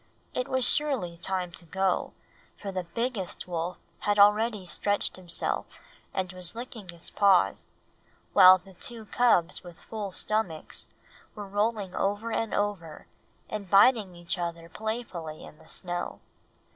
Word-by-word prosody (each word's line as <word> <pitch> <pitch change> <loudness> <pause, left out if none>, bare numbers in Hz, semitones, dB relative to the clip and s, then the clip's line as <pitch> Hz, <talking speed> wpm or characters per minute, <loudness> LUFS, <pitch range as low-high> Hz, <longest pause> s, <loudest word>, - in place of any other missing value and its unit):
It 250 - -1
was 260 -1 +1
surely 265 - +1
time 180 +1 -1
to 170 - -12
go, 190 +2 0 0.4
for 200 - -5
the 185 -2 -3
biggest 225 -1 -3
wolf 175 0 -3 0.2
had 205 0 +1
already 210 0 +5
stretched 205 +3 0
himself 180 -2 -2 0.3
and 185 -1 -2
was 180 +1 -3
licking 235 -5 -8
his 170 -1 -7
paws, 195 -3 +3 0.6
while 185 -1 +10
the 190 +1 -16
two 225 +4 -4
cubs 200 -7 +2
with 175 -2 -12
full 215 -3 -5
stomachs 190 -4 -1 0.5
were 205 -2 -6
rolling 205 -1 0
over 205 +4 -1
and 225 0 -1
over 200 -7 -2 0.4
and 205 -3 -5
biting 200 -2 +5
each 175 +1 -3
other 170 -1 -4
playfully 190 -7 -5
in 155 - -14
the - - -18
snow. 175 -1 -4
195 Hz, 140 wpm, -28 LUFS, 175-215 Hz, 0.6 s, while